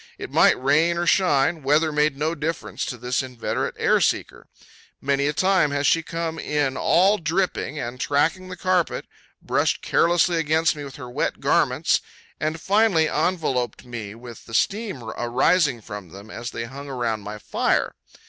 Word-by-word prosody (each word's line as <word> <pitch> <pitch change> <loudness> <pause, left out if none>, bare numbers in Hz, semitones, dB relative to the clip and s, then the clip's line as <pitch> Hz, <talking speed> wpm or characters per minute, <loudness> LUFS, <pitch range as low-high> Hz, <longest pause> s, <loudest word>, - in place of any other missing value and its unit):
It - - -7
might - - +4
rain 155 +6 +2
or 175 - 0
shine; 165 -3 +2
weather 150 +3 +2
made 150 -1 +1
no 155 +3 0
difference 165 +1 -3
to 125 - -5
this 125 +3 -1
inveterate 125 -3 -3
air - - +3
seeker. - - -1 0.5
Many 140 +1 0
a - - +2
time 185 -1 +3
has 145 0 -1
she 165 - +4
come 165 -1 -4
in 145 -3 -1
all 195 +8 +3
dripping, 165 -2 -1
and 125 -2 -5
tracking 160 +8 0
the 185 - -7
carpet, 185 -1 0 0.4
brushed - - 0
carelessly 175 +1 +3
against 160 +1 +2
me 145 - -7
with 135 -2 -9
her 130 -3 -8
wet - - -2
garments, - - +2 0.4
and 155 +1 -2
finally 195 -3 +3
enveloped 150 -8 -1
me 110 -4 -7
with 120 0 -11
the 115 - -5
steam 200 - -1
arising 120 +5 +1
from 105 -4 -8
them 100 +5 -12
as 120 +1 -5
they 115 - -5
hung 140 +4 -8
around 120 -5 -2
my 105 +1 -7
fire. 105 - 0
145 Hz, 165 wpm, -23 LUFS, 125-165 Hz, 0.5 s, might